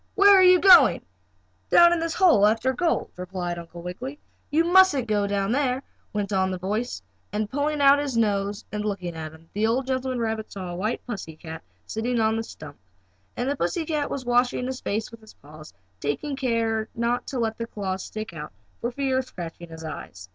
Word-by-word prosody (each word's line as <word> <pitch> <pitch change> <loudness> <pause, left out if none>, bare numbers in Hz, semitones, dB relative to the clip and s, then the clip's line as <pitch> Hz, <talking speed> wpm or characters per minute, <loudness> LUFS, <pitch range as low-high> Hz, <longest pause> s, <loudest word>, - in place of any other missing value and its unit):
Where 405 -1 +7
are 380 - +7
you 365 -1 +7
going?" 360 -7 +7 0.6
"Down 345 0 +6
this 330 0 -2
hole 335 - +5
after 225 +4 +1
gold," 330 +6 0
replied 180 -1 -4
Uncle 170 0 -10
Wiggily. 250 +11 -6 0.3
"You 315 +3 +3
mustn't 345 -7 +5
go 205 -1 +1
down 200 0 -1
there," 260 0 0 0.3
went 205 -1 -2
on 190 -1 +2
the 185 - -3
voice, 210 +7 -3 0.3
and 210 0 -1
pulling 290 +2 -1
out 280 0 +6
his 280 -5 -2
nose 205 -2 0
and 210 0 -3
looking 200 -4 -3
about 160 -2 -7
him, 165 +1 -18
the 215 +2 +1
old 250 +4 0
gentleman 260 -1 -2
rabbit 220 -1 -3
saw 185 -3 -6
a - - -5
white 215 +6 -3
pussy 195 -9 -6
cat 160 0 -9 0.2
sitting 235 +2 -2
on 220 0 +2
a - - -2
stump. 150 -9 -11 0.6
And 245 - -1
the 285 - 0
pussy 290 - -1
cat 300 -2 -1
was 265 -2 -4
washing 245 +1 +2
his 260 0 -4
face 215 +2 -2
with 230 -1 -12
his 220 - -16
paws, 155 +1 -14 0.3
taking 275 - -2
care 230 -4 -1
not 235 +1 -1
to 270 - -4
let 225 -2 -1
the 230 - -3
claws 190 -4 -4
stick 215 -4 -7
out 150 -2 -8 0.3
for 240 - -2
fear 265 0 0
of 260 - -3
scratching 170 -4 -8
his 160 0 -10
eyes. 95 -11 -8
225 Hz, 205 wpm, -25 LUFS, 190-265 Hz, 0.6 s, Where